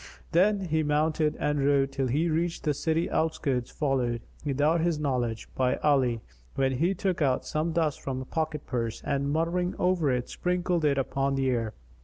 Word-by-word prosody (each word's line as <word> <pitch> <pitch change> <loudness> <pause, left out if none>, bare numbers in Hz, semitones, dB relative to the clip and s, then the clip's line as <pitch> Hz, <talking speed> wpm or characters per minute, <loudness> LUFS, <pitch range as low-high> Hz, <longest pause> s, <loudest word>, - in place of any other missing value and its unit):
Then 195 +4 +3
he 160 -4 0
mounted 150 +1 +1
and 150 -1 0
rode 140 -1 +3
till 135 -2 -1
he 150 +7 +1
reached 165 +1 -1
the 150 - +1
city 160 +3 0
outskirts 135 -6 0
followed, 125 -5 -1 0.2
without 150 +3 +2
his 170 -2 +1
knowledge, 125 -6 -1
by 130 -1 +1
Ali, 130 -6 +2 0.3
when 135 -1 +2
he 165 +9 +1
took 185 -2 -1
out 130 -3 +1
some 155 +2 -1
dust 160 -3 0
from 130 -1 -3
a 130 - -6
pocket 155 0 -3
purse 115 -3 -3
and, 140 0 0
muttering 170 +3 0
over 180 -5 +2
it, 125 -1 -1
sprinkled 180 -2 0
it 140 -2 +3
upon 135 +1 0
the 135 -1 +1
air. 115 -3 -2
150 Hz, 180 wpm, -28 LUFS, 135-165 Hz, 0.3 s, Then